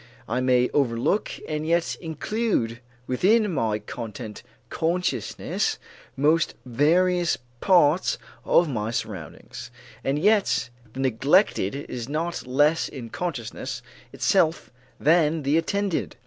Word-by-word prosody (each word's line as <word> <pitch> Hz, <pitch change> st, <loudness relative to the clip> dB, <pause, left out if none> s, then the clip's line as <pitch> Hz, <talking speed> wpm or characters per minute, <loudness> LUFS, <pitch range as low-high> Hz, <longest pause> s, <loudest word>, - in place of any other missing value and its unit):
I 120 Hz, +3 st, -1 dB
may 125 Hz, -1 st, +3 dB
overlook 135 Hz, -, +1 dB, 0.2 s
and 155 Hz, 0 st, -2 dB
yet 170 Hz, 0 st, +1 dB
include 160 Hz, -, -1 dB, 0.3 s
within 205 Hz, -, +2 dB
my 110 Hz, -7 st, 0 dB
content 110 Hz, +1 st, -7 dB
of -, -, -32 dB, 0.3 s
consciousness 175 Hz, +3 st, -1 dB, 0.4 s
most 155 Hz, +4 st, +2 dB
various 170 Hz, +7 st, +2 dB, 0.2 s
parts 175 Hz, -3 st, +4 dB, 0.3 s
of 170 Hz, -, +4 dB
my 110 Hz, -6 st, -2 dB
surroundings; 95 Hz, -9 st, -6 dB, 0.3 s
and 135 Hz, +2 st, 0 dB
yet 200 Hz, -, +2 dB, 0.2 s
the 135 Hz, -, -4 dB
neglected 135 Hz, -, +2 dB
is 125 Hz, -3 st, -6 dB
not 165 Hz, 0 st, -3 dB
less 145 Hz, +5 st, +2 dB
in 120 Hz, -5 st, -8 dB
consciousness 140 Hz, -11 st, -4 dB, 0.3 s
itself 160 Hz, +1 st, +1 dB, 0.3 s
than 155 Hz, 0 st, +3 dB
the 140 Hz, +3 st, +2 dB
attended. 200 Hz, +1 st, -1 dB
150 Hz, 110 wpm, -25 LUFS, 125-175 Hz, 0.4 s, parts